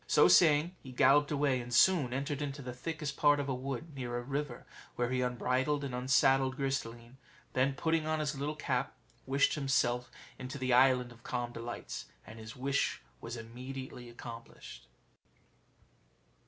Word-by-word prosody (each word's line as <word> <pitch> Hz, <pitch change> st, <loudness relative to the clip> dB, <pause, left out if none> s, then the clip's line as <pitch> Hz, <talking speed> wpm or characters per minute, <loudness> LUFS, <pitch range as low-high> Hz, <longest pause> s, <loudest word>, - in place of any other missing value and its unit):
So -, -, +6 dB
saying, 165 Hz, +1 st, +5 dB
he 130 Hz, -, -10 dB
galloped 140 Hz, +3 st, +4 dB
away, 140 Hz, -3 st, +1 dB
and 120 Hz, 0 st, -9 dB
soon 140 Hz, +1 st, +4 dB
entered 140 Hz, +2 st, -2 dB
into 140 Hz, -1 st, -4 dB
the 125 Hz, 0 st, -5 dB
thickest 150 Hz, +1 st, -5 dB
part 145 Hz, -1 st, +4 dB
of 140 Hz, -, -2 dB
a 135 Hz, -, 0 dB
wood, 135 Hz, +4 st, -5 dB
near 120 Hz, -3 st, -4 dB
a -, -, -2 dB
river 140 Hz, -1 st, -4 dB, 0.3 s
where 120 Hz, 0 st, -1 dB
he 130 Hz, 0 st, +1 dB
unbridled 130 Hz, +3 st, 0 dB
and 135 Hz, -3 st, -4 dB
unsaddled 130 Hz, +1 st, +3 dB
Gris 135 Hz, 0 st, 0 dB
de 115 Hz, -, -8 dB
line; 120 Hz, +2 st, -14 dB, 0.4 s
then, 135 Hz, +1 st, +2 dB
putting 160 Hz, +1 st, 0 dB
on 155 Hz, 0 st, 0 dB
his 150 Hz, -1 st, -1 dB
little 145 Hz, +3 st, -3 dB
cap, 155 Hz, -, -2 dB, 0.3 s
wished 135 Hz, +2 st, +3 dB
himself 125 Hz, -4 st, +1 dB, 0.3 s
in 125 Hz, -, -5 dB
the 130 Hz, -1 st, -1 dB
Island 125 Hz, -1 st, +4 dB
of 120 Hz, -1 st, -16 dB
Calm 120 Hz, 0 st, -3 dB
Delights, 120 Hz, 0 st, -6 dB, 0.2 s
and 110 Hz, +3 st, -11 dB
his 110 Hz, +1 st, -9 dB
wish 140 Hz, +2 st, -1 dB, 0.2 s
was 115 Hz, +1 st, -6 dB
immediately 125 Hz, +2 st, -8 dB
accomplished. 115 Hz, -, -10 dB
130 Hz, 170 wpm, -32 LUFS, 125-145 Hz, 0.4 s, So